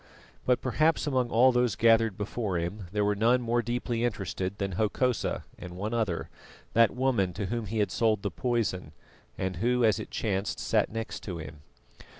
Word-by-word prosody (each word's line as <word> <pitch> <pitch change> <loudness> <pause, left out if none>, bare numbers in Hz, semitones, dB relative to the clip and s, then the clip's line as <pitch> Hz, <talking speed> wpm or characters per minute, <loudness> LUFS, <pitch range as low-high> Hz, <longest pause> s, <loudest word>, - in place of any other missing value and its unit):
But 125 -1 +3
perhaps 150 +8 +2
among 130 -4 +1
all 125 +3 +5
those 125 -4 +1
gathered 115 -3 +4
before 105 -2 -2
him 90 +4 -4
there 105 -1 +1
were 105 - +2
none 115 +5 +3
more 120 0 +1
deeply 120 0 -2
interested 100 -4 -2
than 100 -2 -2
Hokosa 110 +5 0 0.2
and 90 0 -8
one 105 +4 -3
other, 110 -8 -1 0.5
that 115 0 +6
woman 120 -8 +1
to 100 - -3
whom 115 +2 -3
he 110 +3 -3
had 105 -1 +1
sold 110 -3 +1
the 100 - -1
poison, 110 -10 -1 0.4
and 95 -1 -2
who, 120 +4 +2
as 110 - +3
it - - -6
chanced, 100 -3 -2
sat - - +1
next 115 0 -5
to 90 -4 -4
him. 75 -2 -8
110 Hz, 180 wpm, -28 LUFS, 100-120 Hz, 0.5 s, that